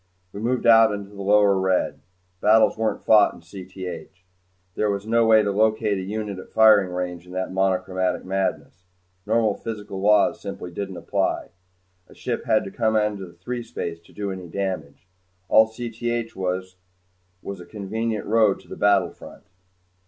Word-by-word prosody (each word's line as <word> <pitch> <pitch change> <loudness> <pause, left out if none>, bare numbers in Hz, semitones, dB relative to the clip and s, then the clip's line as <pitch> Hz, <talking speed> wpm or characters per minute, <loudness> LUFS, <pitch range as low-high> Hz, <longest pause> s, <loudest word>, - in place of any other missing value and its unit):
We 100 - -7
moved 120 +3 -1
out 115 -1 +7
in 100 -1 -5
the 100 - -7
lower 100 0 +4
red. 95 -1 0 0.4
Battles 110 +1 +5
weren't 110 0 -2
fought 105 -2 +5
in - - -15
Cth. 95 +1 -8 0.6
There 105 - 0
was 100 0 -2
no 115 +1 +3
way 110 -1 +6
to 100 - 0
locate 110 0 +1
a - - -3
unit 100 0 -4
at - - -11
firing 110 -4 +5
range 90 -1 -4
in 90 - -11
that 95 0 -3
monochromatic 95 -1 0
madness. 95 -2 -3 0.4
Normal 110 -1 +2
physical 105 -3 -6
laws 105 +1 +3
simply 100 -3 -7
didn't 95 0 -5
apply. - - -1 0.6
A - - -18
ship - - -4
had 110 - +2
to 95 - -7
come 110 -1 0
out 105 -1 +2
into 100 -2 -7
threespace 95 -4 -5
to - - -19
do 100 -1 -4
any 95 -2 -7
damage. 90 -4 -5 0.4
All 110 0 +6
Cth 120 0 -4
was 95 0 -3 0.7
was 100 -2 -6
a - - -11
convenient 110 +1 -3
road 110 -2 +3
to - - -22
the - - -8
battlefront. 100 -4 0
100 Hz, 165 wpm, -23 LUFS, 95-110 Hz, 0.7 s, out